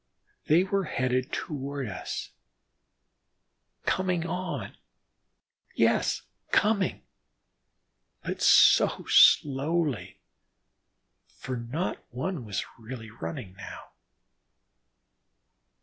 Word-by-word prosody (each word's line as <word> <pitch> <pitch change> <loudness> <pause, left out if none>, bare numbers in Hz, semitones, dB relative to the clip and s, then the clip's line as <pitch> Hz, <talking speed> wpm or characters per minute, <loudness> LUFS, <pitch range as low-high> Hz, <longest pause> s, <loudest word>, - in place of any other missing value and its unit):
They 165 +4 +5
were 195 0 -1
headed 130 0 -1
toward 140 -2 -4
us, 95 - -5 1.5
coming 180 -3 0
on, 170 - -4 1.0
yes! - - +2 0.3
coming, 205 -3 +1 1.2
but - - -4
so - - +5
slowly, 145 -1 +4 1.1
for 130 - -7
not 125 +9 -4
one 135 +2 -4
was 100 -3 -3
really 110 -1 -8
running 95 0 -7
now. 100 - -10
140 Hz, 70 wpm, -28 LUFS, 120-175 Hz, 1.5 s, They